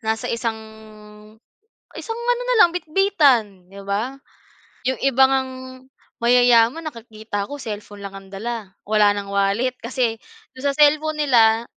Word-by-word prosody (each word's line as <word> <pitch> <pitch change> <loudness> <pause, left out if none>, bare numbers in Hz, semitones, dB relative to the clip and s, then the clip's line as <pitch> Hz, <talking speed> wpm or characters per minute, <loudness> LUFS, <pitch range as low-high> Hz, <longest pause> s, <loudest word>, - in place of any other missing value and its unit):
nasa 220 -1 -2
isang, 230 -1 -2 1.4
isang 455 -1 -5
ano 485 +1 -1
na - - +2
lang 345 - +2
bitbitan, 290 - +1
'di 200 +1 -11
ba? 215 +7 -3 0.7
'Yung 260 - -1
iba 270 -1 +4
ngang 265 -1 0 0.7
mayayaman 245 +4 +4
nakikita 220 -5 -6
ko 290 - -7
cellphone 205 -3 -8
lang 195 0 -8
ang 195 0 -14
dala, 215 -1 -6
wala 210 -1 +4
ng 200 -1 -5
wallet. 200 +6 0
Kasi, 235 -1 -2 0.4
do'n 260 - -11
sa 275 - -15
cellphone 305 +1 +3
nila, 230 -4 +4
235 Hz, 140 wpm, -21 LUFS, 210-275 Hz, 1.4 s, iba